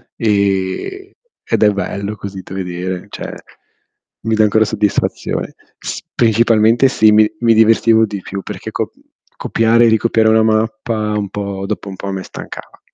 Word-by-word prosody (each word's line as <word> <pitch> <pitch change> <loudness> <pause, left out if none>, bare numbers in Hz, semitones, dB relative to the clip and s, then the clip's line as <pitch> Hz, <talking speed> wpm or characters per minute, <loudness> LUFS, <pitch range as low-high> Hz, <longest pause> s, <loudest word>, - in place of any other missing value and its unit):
e 100 - -1 0.4
ed - - +2
è 105 - +6
bello 100 +1 -4
così 100 -2 -7
da 95 - -9
vedere, 90 -1 -4
cioè, - - -7 0.9
mi 110 0 +1
dà 110 - +4
ancora 110 +1 +3
soddisfazione. 105 -1 -2 0.2
S - - -5
principalmente 115 +2 +3
sì, 110 -4 +4
mi 105 0 +5
mi 115 -1 +4
divertivo 110 0 +4
di 100 -2 -5
più 100 +1 -6
perché - - -7
co - - -3 0.5
copiare 115 +1 +3
e - - +5
ricopiare 110 0 +2
una 110 0 +4
mappa 110 0 0
un 100 -1 -3
po' 100 -1 -4
dopo 100 - -4
un 95 - -7
po' 100 - -7
a - - -2
me 95 -1 -4
stancava. - - -10
110 Hz, 160 wpm, -16 LUFS, 100-110 Hz, 0.9 s, è